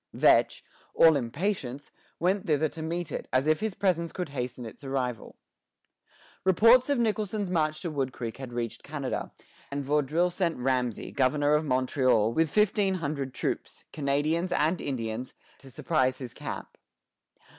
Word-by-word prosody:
Vetch, - - +3 0.3
all 160 -2 +7
impatience, 140 - -3 0.3
went 185 +3 +1
thither 155 0 +2
to 160 - -9
meet 170 +1 -3
it, - - -4
as 130 +2 +2
if 155 0 +3
his 215 -4 -2
presence 170 -4 0
could 180 -4 -4
hasten 125 -2 -4
its 115 +5 -11
arrival. 130 -4 -3 1.1
Reports 230 - +5
of 285 - +2
Nicholson's 215 -4 -1
march 155 -2 0
to 170 - -2
Wood 135 -3 -1
Creek 115 -2 -6
had 135 -2 -7
reached 120 -1 -4
Canada, 140 -3 -4 0.4
and 140 0 -3
Vaudreuil 150 +5 +1
sent 175 -2 -1
Ramesay, 125 -2 -1
governor 145 +2 +2
of 150 +1 +2
Montreal, 130 -4 +2
with 160 +2 +2
fifteen 205 0 +2
hundred 140 -5 -3
troops, - - -4
Canadians, 155 +5 0
and 165 +1 +1
Indians, 120 -2 -4 0.2
to 135 - -13
surprise 130 -1 0
his 125 -3 -8
camp. - - -7
150 Hz, 150 wpm, -28 LUFS, 130-175 Hz, 1.1 s, all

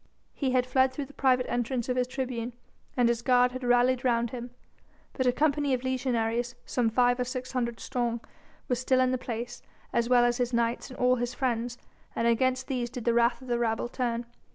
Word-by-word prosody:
He 275 - -1
had 250 -1 +3
fled 260 +1 +3
through 275 +2 -4
the 285 - -16
private 255 -2 +2
entrance 240 0 -1
of 250 - 0
his 250 -1 +1
tribune, 250 -2 -3 0.4
and 245 -1 +4
his 235 -1 +1
guard 250 0 +4
had 255 +1 -6
rallied 245 +1 +3
round 235 -2 +1
him. 245 -1 -6 0.6
But 260 -2 0
a - - +6
company 290 0 +2
of 250 - -6
legionaries 245 -2 -1
some 240 -3 +1
five 245 +2 +3
or - - +2
six 255 +1 -5
hundred 235 -2 -2
strong 235 -2 -2 0.5
was 250 -1 0
still 255 0 +2
in 255 0 +3
the 255 - 0
place, 240 0 -5 0.3
as 235 0 +1
well 245 -1 +5
as 240 0 +1
his 245 -1 -1
knights 235 +2 0
and 255 - -10
all 250 0 +3
his 245 +1 -3
friends, 240 -2 -1 0.4
and 230 - 0
against 255 +2 +2
these 250 -3 -2
did 245 -1 -7
the 235 - +3
wrath 235 +2 +2
of - - -11
the 240 -1 0
rabble 225 0 0
turn. 240 -2 -2
245 Hz, 215 wpm, -28 LUFS, 235-255 Hz, 0.6 s, a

